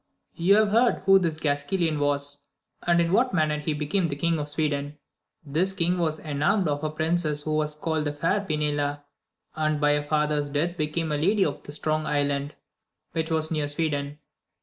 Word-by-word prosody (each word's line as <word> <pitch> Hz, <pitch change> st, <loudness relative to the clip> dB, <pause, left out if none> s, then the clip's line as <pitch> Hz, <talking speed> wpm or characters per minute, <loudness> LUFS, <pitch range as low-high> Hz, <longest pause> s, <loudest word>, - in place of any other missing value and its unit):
|0U 185 Hz, +4 st, +5 dB
have 215 Hz, -1 st, +4 dB
heard 230 Hz, +3 st, +4 dB
who 195 Hz, 0 st, +7 dB
this 165 Hz, -4 st, -1 dB
Gasquilan 155 Hz, +2 st, 0 dB
waSy 145 Hz, 0 st, 0 dB, 0.5 s
and 170 Hz, 0 st, +4 dB
in 170 Hz, 0 st, +1 dB
what 240 Hz, +2 st, +2 dB
manner 155 Hz, -2 st, +1 dB
he 150 Hz, 0 st, -2 dB
became 160 Hz, +4 st, 0 dB
King 160 Hz, +3 st, 0 dB
of 150 Hz, 0 st, -3 dB
Sweden. 145 Hz, -1 st, -1 dB, 0.5 s
This 165 Hz, +7 st, 0 dB
king 180 Hz, 0 st, 0 dB
was 160 Hz, -2 st, 0 dB
enamoured 160 Hz, +6 st, 0 dB
of 145 Hz, +1 st, -2 dB
a 155 Hz, -, 0 dB
princess 155 Hz, -1 st, 0 dB
who 155 Hz, -, -3 dB
was 150 Hz, 0 st, 0 dB
called 155 Hz, 0 st, -1 dB
the 145 Hz, -, -1 dB
fair 165 Hz, +7 st, 0 dB
Pinela, 145 Hz, -4 st, -1 dB, 0.5 s
and 155 Hz, -1 st, 0 dB
by 145 Hz, 0 st, +3 dB
her 145 Hz, 0 st, 0 dB
father's 150 Hz, -1 st, 0 dB
death 160 Hz, +5 st, -1 dB
became 155 Hz, +1 st, -2 dB
Lady 185 Hz, +7 st, +2 dB
of 145 Hz, -1 st, -3 dB
the -, -, -10 dB
Strong 155 Hz, +1 st, -1 dB
Island, 145 Hz, 0 st, -1 dB, 0.6 s
which 160 Hz, 0 st, -2 dB
was 160 Hz, 0 st, +1 dB
near 150 Hz, -2 st, 0 dB
Sweden. 145 Hz, -1 st, -1 dB
155 Hz, 180 wpm, -26 LUFS, 145-170 Hz, 0.6 s, who